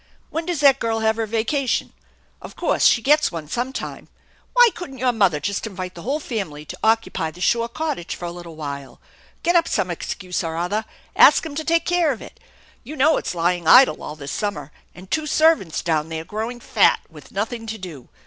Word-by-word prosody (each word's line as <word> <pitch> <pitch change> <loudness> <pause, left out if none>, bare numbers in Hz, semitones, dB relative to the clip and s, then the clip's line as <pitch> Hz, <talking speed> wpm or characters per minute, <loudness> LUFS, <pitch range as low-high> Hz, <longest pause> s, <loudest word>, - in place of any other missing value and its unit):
When 325 +1 -3
does 345 -5 -1
that 275 -2 +6
girl 225 -1 -1
have 220 0 +2
her 225 -1 -1
vacation? 230 +4 -1 0.5
Of - - -10
course - - +1
she 230 - +5
gets 300 +2 +4
one 165 -3 -6
some 245 - -2
time. - - -6 0.5
Why 485 -1 +7
couldn't 280 -7 -8
your 255 0 +2
mother 195 -9 +2
just 200 +6 -3
invite 185 -3 -6
the 170 - -10
whole 275 - -1
family 190 - -5
to - - -8
occupy 225 -7 +1
the 170 - -14
shore 230 +5 +1
cottage 300 - -3
for 175 - -7
a 170 - -4
little 170 -2 -10
while, 140 -3 -7 0.4
get 345 +1 +2
up 335 -1 +4
some - - 0
excuse 180 -1 -4
or 165 -1 -4
other, 205 +6 -1 0.3
ask - - +6
'em 315 - -6
to 315 +2 -3
take 335 +1 +1
care 345 -3 +2
of 240 - -5
it? 470 - -12 0.4
You 295 +6 -8
know 305 +3 +4
it's - - -3
lying 175 0 0
idle 260 +9 +7
all 150 - -6
this 140 -2 -7
summer, 175 -9 -3 0.2
and 185 +1 -13
two 310 -1 0
servants 310 - +2
down 160 -2 0
there 160 0 -5
growing 225 +6 -4
fat - - +3
with - - -15
nothing 225 +3 -3
to 220 0 -4
do. 170 - -10
220 Hz, 210 wpm, -22 LUFS, 175-275 Hz, 0.5 s, Why